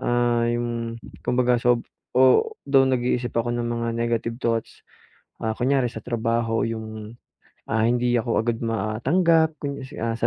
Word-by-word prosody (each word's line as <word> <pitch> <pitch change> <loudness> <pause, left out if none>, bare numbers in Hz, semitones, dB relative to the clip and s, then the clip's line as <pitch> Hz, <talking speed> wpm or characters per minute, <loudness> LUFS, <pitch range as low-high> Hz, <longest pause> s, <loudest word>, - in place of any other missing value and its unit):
ah, 120 -1 +1
'yong 120 -1 -2 0.2
kumbaga 125 -1 +2
sob 120 -1 +2 0.3
o 130 - +4
though 135 -1 +4
nag-iisip 125 -1 0
ako 120 +1 +1
ng 120 0 -2
mga 115 0 -2
negative 115 0 -1
thoughts. 115 -1 -2 0.6
Ah, 110 - 0
kunwari 130 0 +2
sa 110 - -8
trabaho 115 -1 0
'yong, 110 0 -6 0.5
ah, 110 -1 +2
hindi 120 +1 +1
ako 115 0 -1
agad 115 0 -1
matanggap 160 +10 +2
kung 140 -1 -3
i 130 - -7 0.2
ah, 115 0 0
sa 115 - +1
120 Hz, 150 wpm, -24 LUFS, 115-125 Hz, 0.6 s, o